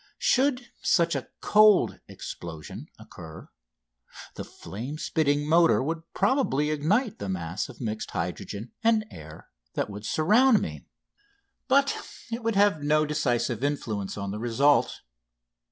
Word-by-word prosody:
Should 260 -2 +1
such 170 -1 +2
a - - -4
"cold" 215 -2 +5
explosion 80 -3 -8
occur, 80 -1 -12 0.8
the - - -6
flame 125 +10 -7
spitting 145 -2 0
motor 165 -3 +4
would 160 +3 -2
probably 155 - +1
ignite 195 - 0
the 100 - -4
mass 90 -1 -3
of 130 - -12
mixed 110 -3 -4
hydrogen 105 +4 -5
and 225 -1 +3
air 80 0 -12 0.3
that 105 - -2
would 105 +1 -7
surround 215 +9 +4
me; - - -6 0.8
but 280 +1 +3 0.4
it 230 +2 -3
would 230 -1 -1
have 200 -6 +3
no 155 +1 +2
decisive 125 -5 -1
influence 110 -10 -2
on 100 -1 -4
the 105 - -5
result. 130 +5 +2
150 Hz, 130 wpm, -26 LUFS, -, 0.8 s, cold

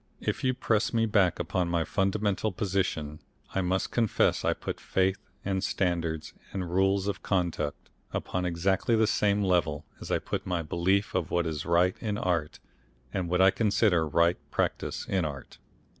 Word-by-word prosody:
If - - -2
you 130 -1 +2
press 115 -2 +1
me 115 0 +3
back 100 -5 +3
upon 85 +1 -1
my 85 -1 +1
fundamental 100 +1 0
position 90 -6 -2 0.3
I 95 - +1
must 95 +1 0
confess 115 -4 +2
I - - +2
put - - -5
faith 95 +1 +1 0.3
and 95 -1 -1
standards 85 -5 -1 0.2
and 90 -3 -4
rules 95 +2 +2
of 100 - -2
conduct 85 -6 -2 0.2
upon 90 - -2
exactly 90 +6 +1
the 110 0 +4
same 105 -1 +2
level 80 -6 +1
as - - -8
I - - +2
put - - -4
my 90 -2 -1
belief 95 +6 +1
of 90 -3 -1
what 85 0 +1
is 80 -1 -3
right 85 +2 +3
in 105 -2 -2
art, 85 -6 -1 0.6
and 90 -2 -2
what 90 +1 +2
I 95 +1 +7
consider 100 -7 +2
right 85 +4 +3
practice - - -2
in 95 -2 +1
art. 70 -4 -6
90 Hz, 170 wpm, -28 LUFS, 85-100 Hz, 0.6 s, I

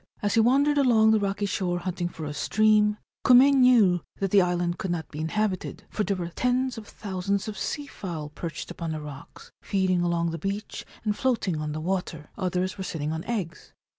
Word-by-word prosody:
As 205 0 +1
he 225 - +4
wandered 280 +5 +4
along 225 -5 +5
the 220 - +4
rocky 200 0 -1
shore 185 -3 -1
hunting 175 -1 -2
for 160 -2 -7
a 150 - -4
stream, 210 +7 +3 0.3
Kume 260 +3 +7
knew 240 -9 +5
that 195 -2 -2
the 200 - +6
island 175 -1 0
could 190 - -3
not 170 -2 -2
be 150 - -8
inhabited, 185 +4 -2
for 210 - -1
there 200 -1 0
were 175 -2 -4
tens 250 +7 0
of 220 -3 -9
thousands 200 0 -3
of 215 - -4
sea 290 +6 -3
fowl 170 - -6
perched 165 +3 -6
upon 165 -2 -4
the 155 - -4
rocks, 145 -2 -11
feeding 185 -2 +1
along 170 -1 0
the 165 - -5
beach 200 +5 -4 0.2
and 210 -1 0
floating 225 -9 0
on 150 0 -3
the 155 - -4
water; 165 -3 -3
others 185 0 -2
were - - -2
sitting 155 -4 -3
on 160 +1 -3
eggs. 190 -9 -4
190 Hz, 200 wpm, -26 LUFS, 170-215 Hz, 0.3 s, Kume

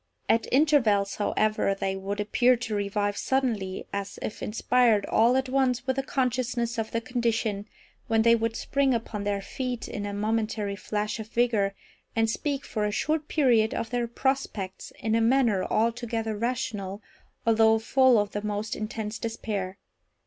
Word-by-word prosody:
At 230 - +2
intervals, 245 -9 +3
however, 215 -1 +1
they 195 0 -2
would 195 +2 -4
appear 240 +4 +3
to 235 -2 -4
revive 205 0 -1
suddenly, 225 -8 -1
as 200 0 -4
if - - -5
inspired 230 -1 +2
all 235 +3 +3
at 265 0 0
once 255 -2 +1
with 260 0 0
a - - +2
consciousness 250 -3 -1
of 220 - -2
their 230 - -2
condition, 225 -4 -1 0.4
when 225 -1 +3
they 230 0 +6
would 230 0 -1
spring 275 0 +1
upon 215 -3 -4
their 200 -1 -1
feet 250 +1 -4
in 205 -1 -4
a - - -3
momentary 215 -1 -1
flash 210 +2 -3
of 220 - -6
vigour, 220 -4 +1 0.4
and 225 -1 +2
speak, 280 +2 -2
for 215 - -2
a 210 - 0
short 305 +7 -1
period, 235 -7 +3
of 225 - -3
their 240 -1 0
prospects, 235 -6 -2
in 220 0 -1
a 225 - +3
manner 230 -5 +3
altogether 225 -1 -1
rational, 210 -4 -3 0.4
although 225 -1 +5
full 255 +2 +4
of 205 -1 +1
the 205 - -3
most 210 +1 -3
intense 215 0 -4
despair. 210 -4 -4
225 Hz, 165 wpm, -27 LUFS, 205-245 Hz, 0.4 s, they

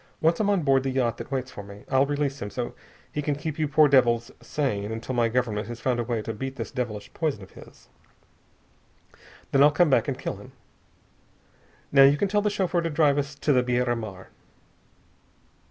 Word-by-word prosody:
Once 165 +1 +2
I'm 210 -2 +1
on 195 -5 +2
board 135 -2 +3
the 135 - -2
yacht 125 -4 0
that - - -7
waits 130 -1 -3
for - - -8
me, 100 0 -12
I'll 135 0 +3
release 145 -1 -2
him 105 - -4
so 120 +2 -4 0.4
he 150 - -2
can 145 0 -1
keep 155 +2 -5
you 155 - +1
poor 150 +1 +5
devils 120 -4 +3
sane 105 -8 -2
until 115 +3 -4
my 120 -2 +2
Government 110 -3 -1
has 120 0 -7
found 125 -1 0
a - - 0
way 115 -2 -2
to 115 - -4
beat 135 +5 -5
this - - -6
devilish 115 -6 -5
poison 150 - -2
of 95 - -14
his. - - -16 1.6
Then 135 - +4
I'll 145 - +8
come 150 +1 +3
back - - +3
and - - -2
kill - - -4
him. - - -14 1.4
Now 140 - +6
you 140 +2 +7
can 200 - +1
tell 205 +1 +2
the 210 - +1
chauffeur 185 -3 0
to 165 - -2
drive 150 -2 +3
us 145 0 -4
to 145 +1 +1
the 125 - +4
Biera 125 0 0
Mar." 100 -5 -8
135 Hz, 210 wpm, -26 LUFS, 120-145 Hz, 1.6 s, I'll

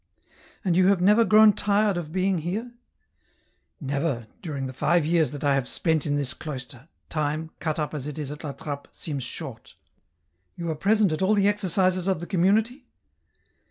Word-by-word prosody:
" - - -28
And 175 -3 +2
you 185 +1 +5
have 195 -2 +4
never 210 +5 +5
grown 215 -1 +6
tired 205 0 +1
of 165 -3 -5
being 185 0 +1
here? 205 +10 -4 0.4
" - - -42
" - - -47
Never, 140 -4 -2 0.2
during 145 -7 -4
the 130 - -6
five 170 +5 +2
years 160 -3 +2
that 145 0 -7
I 140 -1 +3
have 135 -2 0
spent 160 -3 0
in 145 - +1
this 140 -3 -1
cloister, 130 -2 -8 0.2
time, 155 +1 -2
cut 155 -2 -2
up 150 -1 -2
as 145 -2 -4
it 150 - -6
is 145 -2 -4
at 150 +2 -8
La 145 -2 -4
Trappe, 145 -1 -6
seems 145 -5 -4
short." - - -8 0.4
" 85 +2 -48
You 170 -1 -3
are - - -3
present 205 +3 +2
at 155 - -2
all 195 +3 +3
the 200 -1 +3
exercises 185 -2 +1
of 190 -4 +1
the 175 - -6
Com 175 -1 -1
munity 220 +8 +2
160 Hz, 205 wpm, -25 LUFS, 145-195 Hz, 0.4 s, grown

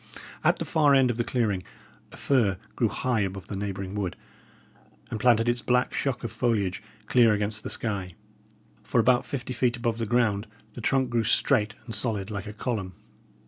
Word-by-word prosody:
At - - +4
the - - -3
far 145 -3 +4
end 130 -2 +4
of 115 - -5
the 120 - +1
clearing, 110 -7 0 0.5
a - - -12
fir 115 -9 +2 0.2
grew 115 - +2
high 120 +3 -1
above 95 -1 -3
the 100 - -4
neighbouring 95 -1 -4
wood, 100 -4 -2 1.0
and 110 - -3
planted 115 0 +4
its 120 0 +1
black 125 0 +1
shock 130 -3 -1
of 115 - -3
foliage 105 -7 0 0.2
clear 115 -3 +5
against 105 +1 -2
the - - -6
sky. 100 -6 -3 0.7
For 120 - 0
about 125 +2 +3
fifty 130 -2 -4
feet 125 -1 +1
above 115 -1 -1
the 115 - -2
ground 110 -3 +1 0.3
the 120 - -8
trunk 130 +2 +1
grew 115 -1 +2
straight 110 -4 +2
and 115 - -6
solid 105 -1 0
like 100 0 -5
a 105 - -6
column. 105 -4 -3
115 Hz, 185 wpm, -27 LUFS, 100-125 Hz, 1.0 s, clear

